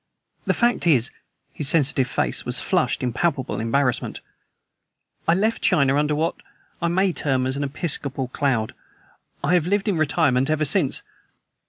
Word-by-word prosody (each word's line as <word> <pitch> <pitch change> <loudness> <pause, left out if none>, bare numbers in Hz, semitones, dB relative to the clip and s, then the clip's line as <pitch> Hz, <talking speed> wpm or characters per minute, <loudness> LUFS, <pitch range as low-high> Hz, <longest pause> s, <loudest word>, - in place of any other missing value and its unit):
The - - +2
fact 240 -7 +1
is" 135 -6 +3 0.4
his 145 -2 -2
sensitive 145 -4 +3
face - - 0
flushed - - 0
in 125 -2 -1
palpable 140 -3 -1
embarrassment 125 +3 0 1.1
"I 165 - +4
left 220 +4 0
China 140 -2 +3
under 150 +1 +1
what 165 +3 -1 0.4
I 170 - +1
may 185 +2 +1
term 130 -5 0
an 135 +2 -2
episcopal 140 -2 -1
cloud. 125 -5 -1 0.7
I - - +1
have 175 -2 +2
lived 200 +2 0
in 195 -5 +1
retirement 145 -4 +1
ever 155 0 +1
since. - - +1
145 Hz, 145 wpm, -23 LUFS, 130-170 Hz, 1.1 s, I